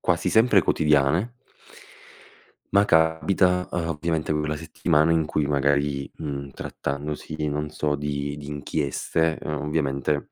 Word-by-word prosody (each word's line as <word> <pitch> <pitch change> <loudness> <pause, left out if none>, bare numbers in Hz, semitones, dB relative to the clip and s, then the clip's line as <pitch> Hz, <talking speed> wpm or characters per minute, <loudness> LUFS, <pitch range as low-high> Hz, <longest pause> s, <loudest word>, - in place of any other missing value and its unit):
quasi - - +1
sempre 110 -5 +5
quotidiane 75 - +2 1.4
ma 100 0 +6
capita, 90 +2 +3
uhm, 85 -1 -2
ovviamente 80 0 -1
quella 75 0 -1
settimana 80 0 +1
in 80 -1 +2
cui 75 0 -1
magari, 70 0 +1
mhmm, 70 -3 -5
trattandosi 75 +3 -5
di 75 -1 -2
non 75 +1 -2
so, 75 -1 -1
di 70 0 -3
di 75 -1 -9
inchieste, 75 +2 -1
uhm, 75 -1 -3
ovviamente 75 -1 -1
75 Hz, 130 wpm, -24 LUFS, 70-80 Hz, 1.4 s, ma